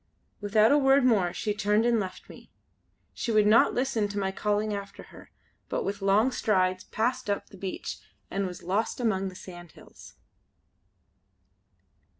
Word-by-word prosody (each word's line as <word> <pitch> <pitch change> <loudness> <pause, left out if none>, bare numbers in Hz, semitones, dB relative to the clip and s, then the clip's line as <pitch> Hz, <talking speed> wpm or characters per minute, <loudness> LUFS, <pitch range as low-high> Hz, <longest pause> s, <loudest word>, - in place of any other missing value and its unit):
Without 215 +3 +3
a 290 - +5
word 270 -1 +4
more 200 -8 +3
she 210 +4 -2
turned 210 +2 +1
and 235 -1 +3
left 185 -2 -6
me. - - -14 0.6
She 235 - -3
would 215 -1 +4
not 215 +2 +5
listen 245 -4 0
to 205 0 -7
my 190 -1 -1
calling 210 +2 -1
after 200 -1 -7
her; - - -14 0.4
but - - -2
with 200 +1 -4
long 205 +6 +3
strides 185 -6 0
passed 245 +1 -2
up 200 - -2
the - - -12
beach 190 0 -5 0.3
and 195 0 -1
was 180 -1 -9
lost 200 +8 -1
among 195 -5 0
the 185 - -13
sandhills. 175 -3 -13
205 Hz, 155 wpm, -27 LUFS, 195-225 Hz, 0.6 s, a